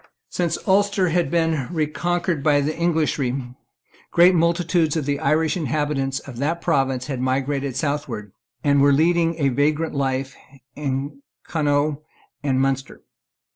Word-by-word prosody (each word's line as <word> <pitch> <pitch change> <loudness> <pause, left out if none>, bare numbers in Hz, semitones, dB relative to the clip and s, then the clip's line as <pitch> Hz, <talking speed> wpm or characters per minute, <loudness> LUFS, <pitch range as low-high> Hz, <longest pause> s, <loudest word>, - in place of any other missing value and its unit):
Since 175 -2 -1
Ulster 200 -1 +3
had 170 -3 +1
been 160 -5 0
reconquered 170 +1 -1
by 145 0 +3
the 150 +2 -2
Englishry, 140 -7 -1 0.6
great 175 +2 +5
multitudes 170 -1 +1
of 150 - -2
the 140 0 -1
Irish 155 0 +1
inhabitants 145 -3 -1
of 135 -4 -9
that 155 +6 -1
province 135 -5 0
had 130 -2 -4
migrated 135 +1 -1
southward, 135 -8 -3 0.3
and 140 -2 +3
were 140 0 +5
now 140 - +3
leading 165 +1 +2
a 140 -4 +2
vagrant 150 +4 0
life 135 -1 -2 0.4
in 140 - -3 0.2
Connaught 145 -1 0 0.4
and 135 -3 0
Munster. 135 0 -2
145 Hz, 135 wpm, -22 LUFS, 135-165 Hz, 0.6 s, great